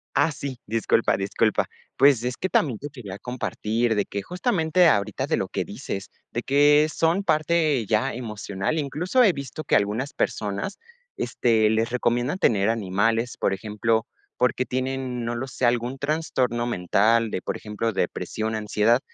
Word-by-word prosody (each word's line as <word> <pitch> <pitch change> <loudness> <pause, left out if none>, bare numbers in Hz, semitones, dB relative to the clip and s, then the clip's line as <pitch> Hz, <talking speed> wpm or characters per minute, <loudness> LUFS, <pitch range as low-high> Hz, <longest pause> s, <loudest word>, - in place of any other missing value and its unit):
Ah, 145 +4 +3
sí, 140 -3 -6
disculpa, 115 +1 +2
disculpa. 100 +2 +1 0.3
Pues, 135 -3 +5
es 125 0 -2
que 190 - -2
también 135 -11 +1
te 145 - -6
quería 115 -9 -8
compartir 120 -1 -1
de 105 - +2
que 100 - -4
justamente 180 - +2
ahorita, 100 -9 +1
de - - 0
lo - - -1
que - - -2
dices, 100 0 -6 0.2
de 120 - -2
que 145 +2 +5
son 165 +4 +1
parte 155 - +2
ya 110 +6 +1
emocional, 105 +1 -3
incluso 165 - +1
he 210 - +6
visto 140 +1 -6
que - - +2
algunas 110 +8 -1
personas, 105 - -2 0.4
este, 110 -3 +2
les 110 +1 +1
recomiendan 120 +5 0
tener 100 - +3
animales, 115 +2 0
por - - +1
ejemplo, 110 +3 0 0.3
porque 125 0 +1
tienen, 130 -1 -3
no 115 +1 -2
lo 125 +3 -4
sé, 130 0 -2
algún 120 +2 +1
trastorno 135 -5 -1
mental 110 +2 +2
de, - - -2
por - - -3
ejemplo, 110 +1 -3
depresión, 110 +4 -2
ansiedad, 110 +2 +2
120 Hz, 160 wpm, -24 LUFS, 110-140 Hz, 0.4 s, he